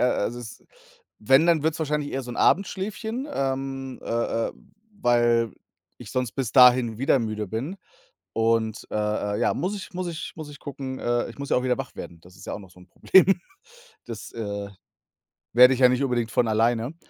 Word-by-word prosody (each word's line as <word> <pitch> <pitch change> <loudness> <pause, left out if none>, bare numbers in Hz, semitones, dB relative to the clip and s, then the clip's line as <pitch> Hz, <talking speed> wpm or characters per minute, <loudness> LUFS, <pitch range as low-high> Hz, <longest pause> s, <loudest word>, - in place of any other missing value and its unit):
also, 120 -1 0
es 120 -1 -10 0.6
wenn 135 +5 +4
dann 165 -3 +3
wird's 160 +1 0
wahrscheinlich 150 -2 -2
eher 135 - -2
so 125 - -8
'n 120 - -7
Abendschläfchen, 215 +6 0
ähm, 135 -1 -3
äh 115 0 -1
äh, - - -8 0.5
weil 120 - +3 0.4
ich - - -11
sonst 125 -3 -2
bis 130 -6 -3
dahin 125 -3 +6
wieder 135 +1 +3
müde 110 -3 -3
bin 120 - -4 0.6
und, 115 -1 0
äh - - -7 0.4
äh, - - -4
ja, - - +2
muss 190 +4 -2
ich 195 - -9
muss 180 0 -3
ich 165 -1 -6
muss 155 -2 -7
ich 145 - -11
gucken, 135 -2 -6
äh, 120 0 0
ich 120 - -12
muss 140 -1 -6
ja - - +3
auch - - -3
wieder 125 -1 +1
wach - - -6
werden. 85 - -8
Das 90 +1 -17
ist 95 - -13
ja - - -4
auch - - -6
noch 95 -3 -14
so 90 - -18
'n 90 - -16
Problem. 190 - +5 0.8
Das, 115 -3 -8
äh, 100 -3 -5 0.8
werde 125 +2 +7
ich 130 - -5
ja 125 - +8
nicht 125 +2 +1
unbedingt 120 -4 0
von 120 -2 +2
alleine. 115 +5 +1
125 Hz, 200 wpm, -25 LUFS, 115-140 Hz, 0.8 s, ja